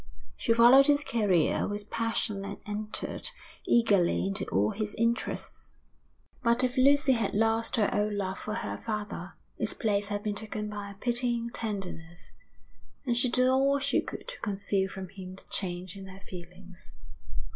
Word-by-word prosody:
She - - -1
followed 240 +4 +8
his 290 0 +4
career 205 - +2
with 205 0 -5
passion 225 -3 -1
and 200 0 -5
entered 210 +1 -4 0.4
eagerly 195 - +3
into 100 0 -1
all 100 +2 +1
his 210 0 -3
interests. 230 +2 -2 0.7
But 235 +1 +3
if 255 0 +1
Lucy 280 +2 +5
had 230 -6 +1
lost 225 +2 +2
her 215 -4 +3
old 210 0 +1
love 190 -2 -2
for 215 - -4
her 230 - -3
father, 210 -2 -4 0.3
its - - 0
place 205 -2 0
had 205 0 -3
been 210 - -1
taken 210 0 -4
by 205 -1 -5
a 200 - -10
pitying 240 +1 0
tenderness; 180 -7 -5 0.7
and 240 -2 +1
she 245 +1 +2
did 255 +1 +3
all 270 +2 +4
she 280 0 +1
could - - -8
to - - -7
conceal 200 -1 -1
from 190 -1 -7
him 185 -1 -9
the - - -11
change 180 -1 -2
in 195 -1 -9
her 190 +1 -11
feelings. 180 0 -11
210 Hz, 165 wpm, -29 LUFS, 195-235 Hz, 0.7 s, followed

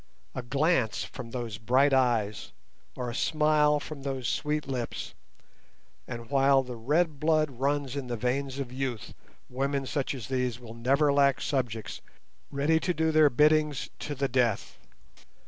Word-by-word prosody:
A - - -4
glance 135 -1 +1
from 125 -3 -8
those 115 -2 -5
bright 130 +5 +3
eyes 115 -5 +1 0.4
or 125 -1 -4
a - - -7
smile 150 +1 +2
from 145 0 -8
those 135 -3 -3
sweet 150 +2 -1
lips, 125 -3 -4 0.9
and 115 -1 -7
while 135 -1 +4
the 125 -1 -7
red 150 +6 0
blood 155 -1 +2
runs 140 -1 0
in 140 -3 -4
the 120 -1 -3
veins 130 +3 -1
of 135 -3 -4
youth 130 -5 -4 0.3
women 135 +2 -2
such 140 0 -2
as 120 -6 -7
these 125 -2 -1
will 115 -2 -10
never 140 +5 +2
lack 140 -3 +3
subjects 120 -6 -3 0.5
ready 145 +3 +2
to 180 +1 -1
do 160 0 +1
their 155 -1 +6
biddings 150 +1 +2
to 145 - -4
the 140 +1 0
death. 120 -5 0
135 Hz, 155 wpm, -28 LUFS, 125-150 Hz, 0.9 s, their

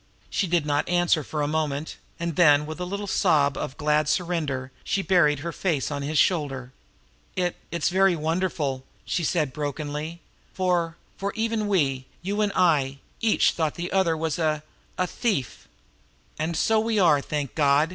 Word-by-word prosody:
She 195 - 0
did 170 -3 +1
not 145 0 0
answer 175 -3 +3
for 150 +1 -3
a - - 0
moment; 150 -1 -2 0.2
and 170 -2 -2
then 150 -3 +5
with 155 +2 -7
a 180 - -2
little 200 +3 -4
sob 150 -8 +2
of 135 - -5
glad 150 0 +2
surrender 155 -7 -1
she 195 - -1
buried 150 -7 +3
her 170 +2 -3
face 160 -6 -1
on 145 -1 -3
his 150 +2 -2
shoulder. 140 -7 +1 0.6
"It 180 -1 0
it 170 -3 -4
is - - +4
very 190 0 +4
wonderful," 155 -4 -1 0.2
she 175 - -1
said 155 -5 0
brokenly, 150 +3 -4 0.4
"for 175 -3 0 0.2
for 200 0 -3
even 225 -1 0
we, 135 -9 +1 0.2
you 200 +3 -1
and 205 -1 +2
I, 145 -7 +3 0.2
each 225 -2 +4
thought 160 -3 -1
the 175 +1 -4
other 190 -4 +2
a 155 -1 -1 0.3
a 185 - +2
thief." 180 - -2 0.7
"And 160 +1 -1
so 220 +5 +3
we 220 -1 +1
were, 155 -6 +5
thank 145 -2 -3
God!" 145 +1 +3
160 Hz, 170 wpm, -25 LUFS, 145-180 Hz, 0.7 s, then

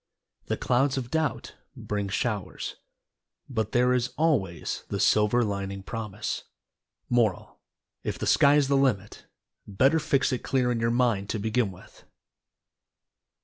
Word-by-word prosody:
The - - -1
clouds 135 +2 +1
of 125 -2 -4
Doubt 160 -1 -1 0.2
bring 100 -1 -3
showers, 105 -2 -3 0.7
but 110 -5 -2
there 125 0 +3
is 125 -1 +1
always 110 - 0
the - - -3
"Silver 110 +3 +3
Lining" 100 -2 -3
promise. 110 -1 -4 0.6
Moral: 115 -6 0 0.4
If - - -3
the - - -4
sky 140 +1 +5
is 145 -2 +3
the 140 - +2
limit 105 -7 0 0.4
better 135 +11 +3
fix 140 -2 +1
it 125 - -1
clear 125 -2 +1
in 120 - -1
your 115 0 +1
mind 115 -5 +1
to 110 - -2
begin 110 0 0
with. 90 0 -16
115 Hz, 140 wpm, -27 LUFS, 100-130 Hz, 0.7 s, sky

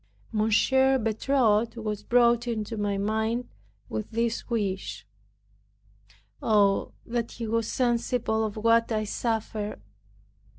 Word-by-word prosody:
M. 215 0 +1 0.5
Bertot 225 -1 +2
was 215 -2 -3
brought 240 +1 +3
into 225 -1 -3
my 205 -2 -1
mind, 220 +4 -1 0.4
with 110 0 -4
this 230 +1 -2
wish, 200 -5 -2 1.4
"Oh, 205 -3 +2
that 235 -1 -3
he 235 - -5
was 225 0 0
sensible 240 -2 0
of 215 -1 -3
what 230 +1 +3
I 215 -1 +1
suffer!" 215 -1 -2
225 Hz, 110 wpm, -27 LUFS, 210-235 Hz, 1.4 s, brought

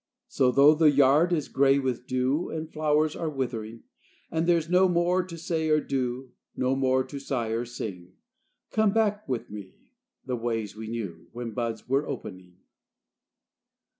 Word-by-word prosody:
So 125 -1 +2
'though 140 +4 +7
the 155 0 +5
yard 145 +4 +4
is 155 -5 0
gray 135 0 +3
with 130 -2 -2
dew, 130 +6 0
And 160 0 -4
flowers 155 0 +1
are 165 - -2
withering, 115 -5 -4 0.5
And 165 +1 0
there's 170 -2 +2
no 180 +2 +4
more 175 +1 +2
to 175 -2 -9
say 160 -1 -2
or 155 0 +4
do, 130 -2 -3 0.2
No 130 +1 +1
more 130 -1 +2
to 140 +1 -8
sigh 130 -4 -2
or 115 +2 -1
sing, 95 -7 -7 0.6
Come 215 -2 +2
back 210 -4 0
with 125 -5 -3
me 100 -3 -9 0.5
the 130 -2 -2
ways 115 -3 -3
we 110 0 -7
knew 105 -8 -6
When 120 -1 -5
buds 115 -1 -4
were 135 +3 +1
opening. 90 -2 -8
135 Hz, 165 wpm, -27 LUFS, 115-155 Hz, 0.6 s, though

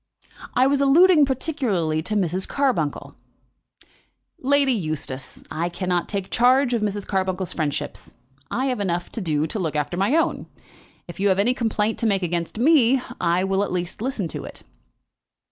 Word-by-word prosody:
"I 255 - +4
was 280 +1 +2
alluding 305 +2 +6
particularly 235 - -1
to 215 +6 -4
Mrs. 185 -1 0
Carbuncle." 245 - -1 1.3
"Lady 280 0 +3
Eustace, 155 - -4
I 170 +2 -2
cannot 175 0 -2
take 195 -2 -4
charge 250 +1 +3
of 235 - 0
Mrs. 205 -1 -2
Carbuncle's 185 -1 -2
friendships. 150 -3 -3 0.3
I 260 +3 -1
have 255 -4 -1
enough 175 -3 -2
to 225 - -5
do 155 -4 0
to 185 +7 -4
look 160 -5 -2
after 150 +4 -2
my 200 +10 +2
own. 330 - 0 0.6
If 175 - -10
you 200 - +2
have 190 - +2
any 220 +6 +3
complaint 225 -3 -1
to 230 - +1
make 195 -3 +1
against 170 +2 -2
me, 265 -1 +4 0.2
I 175 +2 +1
will 195 +1 +1
at 205 - -4
least 180 +2 -3
listen 235 -7 -2
to - - -5
it." - - -11
200 Hz, 165 wpm, -23 LUFS, 175-255 Hz, 1.3 s, alluding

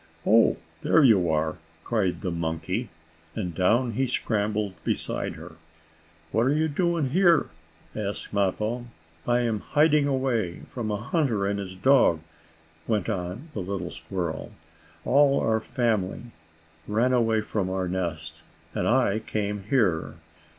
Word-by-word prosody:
"Oh, 115 +1 +5 0.2
there 160 - +4
you 100 -9 +5
are!" 80 +1 0 0.3
cried 105 -6 0
the 90 - -2
monkey, 85 +7 -2 0.5
and 90 -6 -3
down 115 +8 +2
he 130 +4 0
scrambled 105 -4 -1
beside - - -2
her. - - -11 0.7
"What 115 +3 +2
are 135 - +3
you 155 +1 +2
doing 160 -2 0
here?" 175 -2 +4 0.5
asked 105 -1 -4
Mappo. 105 +5 -1 0.4
"I 120 0 +3
am 115 -3 0
hiding 150 +3 +3
away 130 -9 -1
from 115 -4 -5
a 105 - -1
hunter 115 - 0
and 100 0 -1
his 95 -2 -6
dog," 110 - +4 0.7
went 110 -2 0
on 95 - -4
the - - -4
little 90 -2 -4
squirrel. 85 -1 -4 0.5
"All 140 +1 +4
our 110 0 +1
family 110 -4 -1 0.6
ran 115 +5 +2
away 115 -3 +2
from 105 -3 -2
our 95 -1 -1
nest, 80 -3 -4 0.3
and - - -1
I 120 -4 +3
came 105 -2 -3
here. 100 - +1
110 Hz, 135 wpm, -26 LUFS, 95-125 Hz, 0.7 s, Oh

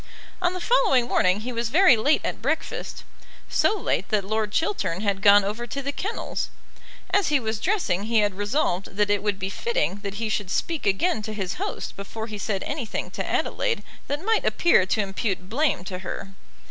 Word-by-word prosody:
On 355 0 +2
the 365 - -4
following 275 - +3
morning 185 -2 +2
he 250 +3 -4
was 230 0 -1
very 335 0 +6
late 275 +8 +2
at - - -3
breakfast, - - -3 0.4
so 430 - +2
late - - -1
that 210 -3 +1
Lord 215 0 -1
Chiltern 205 - 0
had 200 -2 0
gone 205 0 +7
over 215 +4 -3
to 275 - -4
the 280 +1 -2
kennels. 395 +9 -3 0.6
As 400 - +3
he 295 -2 +3
was 220 -3 -2
dressing 215 - 0
he 230 +1 +1
had 205 -1 +1
resolved 200 -2 -1
that 205 0 +2
it 205 - +2
would 205 -1 0
be 190 0 -3
fitting 470 - -1
that 200 -1 -5
he 225 +1 -2
should 205 -3 -1
speak 320 - -1
again 215 - +2
to 215 0 -5
his 190 -3 -2
host - - -4
before 220 +3 -6
he 215 -2 -7
said 195 -1 -2
anything 285 -7 -4
to - - -3
Adelaide - - 0 0.2
that 295 +6 -3
might 445 0 +2
appear 265 - +4
to 215 - +1
impute 195 -1 -2
blame 280 - +1
to 185 -1 -5
her. 190 +1 -6
215 Hz, 200 wpm, -25 LUFS, 200-290 Hz, 0.6 s, gone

